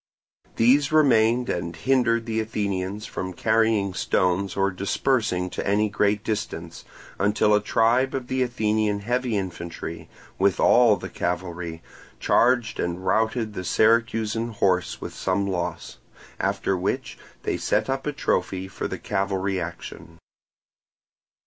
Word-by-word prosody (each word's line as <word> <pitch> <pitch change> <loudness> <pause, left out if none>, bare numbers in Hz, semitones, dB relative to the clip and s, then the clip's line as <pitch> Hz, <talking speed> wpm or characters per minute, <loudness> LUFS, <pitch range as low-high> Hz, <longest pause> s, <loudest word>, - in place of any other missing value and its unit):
These 135 +5 +4
remained 125 -5 +4
and 85 -1 -3
hindered 115 +2 +1
the 110 -1 -1
Athenians 105 -2 -3
from 95 0 -5
carrying 110 -1 +1
stones 95 +1 0
or 100 0 +2
dispersing 100 0 0
to - - -4
any 105 +1 +2
great 105 0 +1
distance, 85 -6 -4 0.4
until 105 +1 +3
a 105 - +4
tribe 120 +6 +2
of 130 -2 -3
the 130 +1 -1
Athenian 110 -4 0
heavy 120 +1 -1
infantry, 85 -3 -6 0.3
with 95 -1 +2
all 120 -3 +5
the - - -7
cavalry, 85 -2 -4 0.4
charged 120 -2 +2
and 85 +2 -3
routed 110 0 +1
the 90 - -5
Syracusan 115 +3 +1
horse 90 -3 0
with - - -6
some 95 +1 -1
loss; 90 -3 -4 0.4
after 95 - 0
which 90 +2 -3 0.2
they - - -1
set - - 0
up 135 +1 -2
a - - +1
trophy 95 -8 -1
for 95 - -4
the - - -5
cavalry 95 -1 -1
action. 80 -1 -8
105 Hz, 130 wpm, -24 LUFS, 95-115 Hz, 0.4 s, all